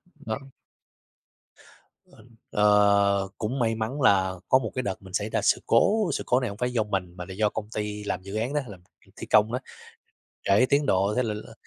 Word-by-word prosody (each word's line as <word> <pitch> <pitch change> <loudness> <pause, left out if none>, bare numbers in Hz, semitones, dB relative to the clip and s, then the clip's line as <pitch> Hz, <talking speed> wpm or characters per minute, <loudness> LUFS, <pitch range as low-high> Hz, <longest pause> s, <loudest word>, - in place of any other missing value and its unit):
Đó. 110 +2 -5 1.7
Ờ, - - -19 0.3
ờ, 100 -1 +3
cũng 125 +5 -3
may 115 -1 +1
mắn 115 +6 -3
là 95 -5 +4 0.2
có 130 - +6
một 110 -4 -5
cái 130 - -1
đợt 95 -1 -4
mình 95 -1 -13
xảy 105 +1 -1
ra - - 0
sự - - +3
cố, 200 - +3
sự - - -2
cố 125 +1 +3
này 125 -4 -2
hông 100 - -8
phải 125 +1 -1
do 110 -3 +2
mình 95 -4 -3
mà 90 - -6
là 95 - -7
do 105 +1 +1
công 105 0 -5
ty 105 -1 -4
làm 95 -2 -3
dự 100 +2 -7
án 120 +6 -2
đó, 150 - +1
làm 95 -4 -10 0.3
việc - - -23
thi - - -7
công 110 +2 +4
đó, 125 - -1 0.8
trễ 100 +6 +4
tiến 145 +1 +3
độ 100 -1 +2
thế 125 - +2
là 110 -2 -2
là 105 - -9
105 Hz, 220 wpm, -26 LUFS, 100-125 Hz, 1.7 s, có